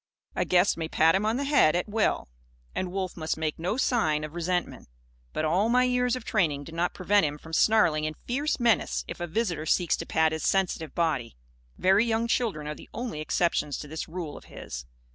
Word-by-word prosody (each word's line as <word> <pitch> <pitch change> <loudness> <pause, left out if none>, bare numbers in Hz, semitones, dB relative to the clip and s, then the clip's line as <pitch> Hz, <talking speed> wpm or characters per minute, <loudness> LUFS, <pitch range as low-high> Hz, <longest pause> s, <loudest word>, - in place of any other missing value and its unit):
A - - 0
guest 180 +1 +3
may 165 -1 -3
pat 160 0 +4
him 200 +3 +1
on 225 +2 +1
the 280 - -1
head, 280 - +4
at 175 - 0
will; 215 0 0 0.5
and 185 -1 -3
Wolf 190 -1 -3
must 160 -2 -2
make 160 -1 -2
no 180 +8 -1
sign 160 -13 +1
of 155 0 -6
resentment. 175 - -2 0.4
But 155 - -1
all 185 +8 +2
my 250 +1 +4
years 250 0 +1
of 250 -2 -7
training 155 -9 +1
do 160 - -10
not 170 +2 -1
prevent 205 +3 +3
him 150 -1 -1
from 160 +2 -13
snarling 160 -6 +3
in 155 0 -3
fierce 280 +5 -1
menace 235 -2 +1
if - - -7
a 175 - -3
visitor 170 -4 -2
seeks 175 -2 +2
to - - -6
pat 160 0 +2
his 160 0 -3
sensitive 180 -5 0
body. 155 - -1 0.4
Very 195 +3 +4
young 230 0 0
children 220 -11 0
are 150 - -3
the - - -13
only 235 -10 -4
exceptions 155 -3 0
to 150 - -7
this 155 +2 -5
rule 165 -3 -6
of - - -12
his. 60 0 -8
175 Hz, 215 wpm, -27 LUFS, 155-220 Hz, 0.5 s, pat